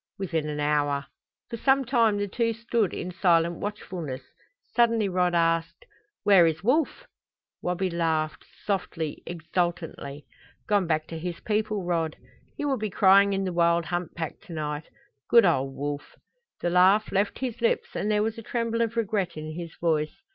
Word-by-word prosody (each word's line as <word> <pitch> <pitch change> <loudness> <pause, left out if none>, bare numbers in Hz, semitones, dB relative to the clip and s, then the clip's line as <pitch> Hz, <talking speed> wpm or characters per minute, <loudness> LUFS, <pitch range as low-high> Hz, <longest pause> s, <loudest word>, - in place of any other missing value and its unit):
"Within 165 -5 -2
an 150 0 -4
hour." 145 -1 +1 0.5
For 230 - -3
some 270 +3 +3
time 230 -4 +3
the 205 0 -1
two 230 +3 0
stood 230 -3 0
in 180 - -5
silent 170 -2 +2
watchfulness. 180 -9 -5 0.5
Suddenly 230 -3 +3
Rod 180 -1 +1
asked: 165 - +1 0.4
"Where 195 -5 +6
is 160 +2 -2
Wolf?" 305 - +1 0.6
Wabi 180 +1 -1
laughed, 160 -3 -1 0.2
softly, 170 -6 -2
exultantly. 165 -4 -3 0.4
"Gone 200 -4 +2
back 155 -1 +1
to 165 - -5
his 170 0 -5
people, 215 -2 -1
Rod. 165 -3 -1 0.4
He 290 - -2
will 275 -2 +1
be 215 0 -2
crying 200 +1 +5
in 195 0 0
the 185 -2 -2
wild 170 0 +3
hunt 175 +1 -3
pack 165 -2 -4
to 175 - -8
night. 150 -1 -4 0.4
Good 235 -2 +7
old 135 -6 +1
Wolf!" 145 +1 -5 0.5
The 175 - 0
laugh 190 +4 +4
left 200 +1 +1
his 245 -3 -4
lips 230 - +1
and 210 - -1
there 210 0 +2
was 225 +1 -2
a - - -7
tremble 230 0 -1
of 230 0 -1
regret 200 -6 -1
in 155 0 -5
his 165 0 -7
voice. 155 - 0
180 Hz, 170 wpm, -26 LUFS, 160-215 Hz, 0.6 s, Good